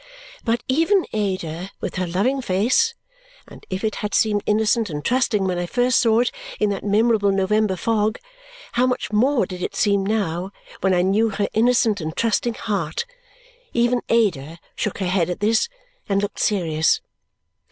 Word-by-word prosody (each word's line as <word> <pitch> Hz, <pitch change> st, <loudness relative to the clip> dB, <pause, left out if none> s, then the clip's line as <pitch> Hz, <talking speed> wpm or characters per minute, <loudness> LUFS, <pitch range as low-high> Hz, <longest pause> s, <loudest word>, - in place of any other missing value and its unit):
But 235 Hz, 0 st, 0 dB
even 330 Hz, +8 st, +2 dB
Ada, 185 Hz, -4 st, -2 dB
with -, -, -5 dB
her 185 Hz, -1 st, -1 dB
loving 225 Hz, +11 st, 0 dB
face 250 Hz, -, +2 dB, 0.5 s
and -, -, -14 dB
if 185 Hz, +1 st, -4 dB
it 215 Hz, -1 st, -1 dB
had 210 Hz, -, -3 dB
seemed 210 Hz, -2 st, +2 dB
innocent 220 Hz, +1 st, +2 dB
and 150 Hz, -2 st, -5 dB
trusting 240 Hz, -5 st, +1 dB
when 180 Hz, -2 st, -1 dB
I 175 Hz, -, -2 dB
first 245 Hz, +5 st, +2 dB
saw 230 Hz, -1 st, +4 dB
it 245 Hz, -, 0 dB, 0.3 s
in 210 Hz, -1 st, +2 dB
that 200 Hz, -, -4 dB
memorable 210 Hz, 0 st, +3 dB
November 195 Hz, +1 st, +1 dB
fog, 215 Hz, +3 st, 0 dB, 0.5 s
how 250 Hz, +2 st, +2 dB
much 250 Hz, -3 st, -2 dB
more 245 Hz, +1 st, +3 dB
did 180 Hz, 0 st, -8 dB
it -, -, -3 dB
seem 200 Hz, -2 st, +2 dB
now 195 Hz, -4 st, -1 dB, 0.3 s
when 190 Hz, -1 st, +2 dB
I 175 Hz, -, +2 dB
knew 210 Hz, +4 st, +2 dB
her 205 Hz, -1 st, -1 dB
innocent 225 Hz, -3 st, +2 dB
and 160 Hz, +1 st, -5 dB
trusting 230 Hz, +1 st, +1 dB
heart 215 Hz, -, -2 dB, 0.7 s
even 240 Hz, +1 st, +2 dB
Ada 170 Hz, -9 st, +1 dB, 0.2 s
shook 210 Hz, -, -2 dB
her 195 Hz, -, -2 dB
head 180 Hz, -2 st, +1 dB
at 180 Hz, -, -3 dB
this 220 Hz, -, +2 dB, 0.4 s
and 195 Hz, 0 st, +2 dB
looked 205 Hz, -, -4 dB
serious. 160 Hz, -6 st, +2 dB
210 Hz, 170 wpm, -22 LUFS, 185-235 Hz, 0.7 s, saw